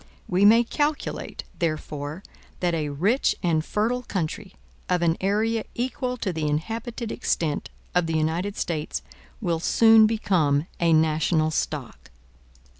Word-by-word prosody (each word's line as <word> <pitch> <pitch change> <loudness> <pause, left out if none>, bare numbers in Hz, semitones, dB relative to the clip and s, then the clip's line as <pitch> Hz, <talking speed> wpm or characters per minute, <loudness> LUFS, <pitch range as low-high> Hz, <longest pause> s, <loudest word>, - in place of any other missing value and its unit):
We 185 +2 +3
may 230 +3 +7
calculate, 295 +5 -2 0.2
therefore, 155 0 -3 0.4
that 175 -1 0
a 155 -3 -1
rich 195 - +1
and 160 -3 +2
fertile 230 +8 0
country, 190 -2 -4 0.3
of 180 -1 +2
an 165 -1 +3
area 215 +3 +1
equal 250 +1 -2
to 195 -6 -2
the 155 -2 -2
inhabited 225 - -3
extent 155 -3 -1 0.2
of 180 -2 +2
the 160 -1 0
United 170 +6 -1
States, 155 -3 -3 0.4
will 170 -2 0
soon 225 +4 +6
become 165 -10 +1
a 170 -1 +3
national 155 0 +2
stock. - - -4
180 Hz, 130 wpm, -25 LUFS, 155-225 Hz, 0.4 s, may